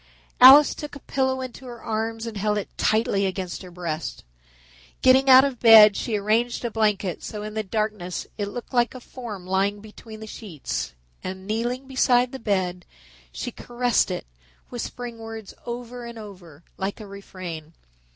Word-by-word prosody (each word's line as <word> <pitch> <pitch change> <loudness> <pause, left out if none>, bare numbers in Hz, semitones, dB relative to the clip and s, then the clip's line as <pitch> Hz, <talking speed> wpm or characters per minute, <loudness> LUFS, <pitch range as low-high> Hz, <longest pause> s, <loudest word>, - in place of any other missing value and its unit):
Alice 275 +4 +9
took 295 -1 -8
a - - -8
pillow 265 -1 -1
into 255 0 -8
her 240 -1 -9
arms 225 +1 -3
and 230 -2 -6
held 210 +1 0
it 205 - -5
tightly 215 -3 +1
against 185 -2 -4
her 185 - -10
breasts. 170 -3 -5 0.8
Getting 260 +1 +5
out 260 0 +10
of 265 -4 -3
bed, 220 -3 +9
she 220 -3 -1
arranged 230 +4 0
a 235 - -2
blanket 210 -5 0
so 210 - -6
that - - -6
in - - -12
the 220 - -1
darkness 210 -3 -3
it 205 -2 -3
looked 240 +5 -8
like 240 +1 +2
a - - -7
form 230 -7 -8
lying 195 +2 0
between 215 +1 -12
the 220 - -8
sheets 170 - -5 0.3
and, 190 0 -6
kneeling 240 +5 -2
beside 250 -2 +2
the 265 - -7
bed, 185 -4 -1 0.5
she - - -5
caressed 245 -2 0
it, 180 - -4 0.4
whispering 240 -1 -6
words 225 -2 -8
over 240 0 -6
and 235 -1 -9
over, 180 -8 -12
like 195 +3 -3
a 215 - -8
refrain. 185 -5 -8
220 Hz, 170 wpm, -24 LUFS, 195-245 Hz, 0.8 s, out